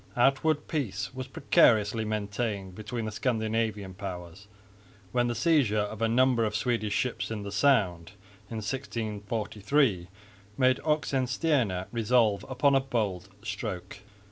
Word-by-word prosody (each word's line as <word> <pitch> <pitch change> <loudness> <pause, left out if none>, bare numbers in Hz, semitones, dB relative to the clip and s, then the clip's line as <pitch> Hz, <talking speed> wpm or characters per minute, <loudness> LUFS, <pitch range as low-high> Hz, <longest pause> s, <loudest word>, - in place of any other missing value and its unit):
Outward 140 +4 +2
peace 100 - -3
was 130 0 -6
precariously 110 -4 +3
maintained 100 -2 -3
between 110 +3 -5
the 110 - -3
Scandinavian 110 -4 -1
powers, 90 0 -8 0.6
when 120 +1 +2
the 120 - -1
seizure 130 -4 +3
of 105 +1 -2
a 115 - +3
number 125 0 +3
of 105 -1 -1
Swedish 110 -3 0
ships 125 - -1
in 110 -2 -4
the 100 - -6
Sound 100 -7 +2 0.4
in 115 - -5
1643 110 -2 -1 0.5
made 130 -1 +3
Oxenstierna 135 - +1
resolve 115 -3 +2
upon 140 +2 +3
a 135 - +5
bold 105 -9 -2
stroke. 100 -3 -5
110 Hz, 125 wpm, -28 LUFS, 100-130 Hz, 0.6 s, a